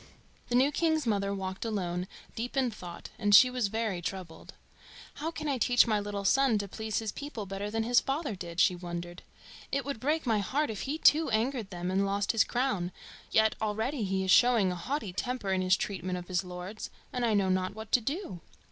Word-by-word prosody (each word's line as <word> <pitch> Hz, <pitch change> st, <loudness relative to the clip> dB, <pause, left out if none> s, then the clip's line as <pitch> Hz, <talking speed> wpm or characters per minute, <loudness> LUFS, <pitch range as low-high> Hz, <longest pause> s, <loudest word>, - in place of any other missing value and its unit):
The 245 Hz, -, +1 dB
new 265 Hz, +4 st, +4 dB
king's 315 Hz, -1 st, +1 dB
mother 200 Hz, -3 st, 0 dB
walked 190 Hz, -1 st, -4 dB
alone, 180 Hz, -5 st, -2 dB, 0.3 s
deep 245 Hz, +4 st, -4 dB
in 255 Hz, -3 st, +2 dB
thought; 175 Hz, -5 st, -9 dB
and 205 Hz, -2 st, +5 dB
she 255 Hz, +4 st, +8 dB
was 250 Hz, -4 st, 0 dB
very 220 Hz, -4 st, -2 dB
troubled. 175 Hz, -2 st, -7 dB, 0.7 s
"How 320 Hz, -, -1 dB
can 315 Hz, -2 st, -5 dB
I 275 Hz, -3 st, 0 dB
teach 245 Hz, +1 st, +5 dB
my 215 Hz, -3 st, +1 dB
little 205 Hz, -1 st, -4 dB
son 270 Hz, 0 st, +4 dB
to 205 Hz, -1 st, -3 dB
please 220 Hz, +2 st, -4 dB
his 220 Hz, -2 st, -2 dB
people 280 Hz, -8 st, -6 dB
better 195 Hz, +1 st, -4 dB
than 225 Hz, +1 st, -1 dB
his 240 Hz, +2 st, +4 dB
father 280 Hz, -2 st, -2 dB
did?" 170 Hz, -2 st, -7 dB
she 180 Hz, -, +5 dB
wondered. 175 Hz, 0 st, -6 dB, 0.5 s
"It 275 Hz, 0 st, -1 dB
would 280 Hz, -5 st, -4 dB
break 300 Hz, +6 st, 0 dB
my 225 Hz, -3 st, +2 dB
heart 280 Hz, +7 st, 0 dB
if 210 Hz, -, -5 dB
he 300 Hz, -, -1 dB
too 320 Hz, 0 st, +5 dB
angered 225 Hz, -1 st, 0 dB
them 180 Hz, 0 st, -4 dB
and 195 Hz, +1 st, +2 dB
lost 200 Hz, 0 st, 0 dB
his 225 Hz, -3 st, +4 dB
crown, 210 Hz, -9 st, -1 dB, 0.4 s
yet 220 Hz, 0 st, +4 dB
already 220 Hz, +5 st, -1 dB
he 190 Hz, -1 st, 0 dB
is 190 Hz, -, +1 dB
showing 235 Hz, -6 st, +5 dB
a -, -, -3 dB
haughty 215 Hz, -, -3 dB
temper 225 Hz, -1 st, -2 dB
in 185 Hz, -, +1 dB
his 185 Hz, 0 st, +3 dB
treatment 185 Hz, -2 st, -3 dB
of 175 Hz, 0 st, -8 dB
his 180 Hz, -1 st, 0 dB
lords, 180 Hz, +3 st, -7 dB, 0.2 s
and 250 Hz, -1 st, -1 dB
I 225 Hz, -3 st, +2 dB
know 195 Hz, -2 st, +2 dB
not 185 Hz, +1 st, 0 dB
what 220 Hz, -1 st, -8 dB
to 250 Hz, -, +4 dB
do." 275 Hz, -, -4 dB
215 Hz, 215 wpm, -30 LUFS, 190-250 Hz, 0.7 s, she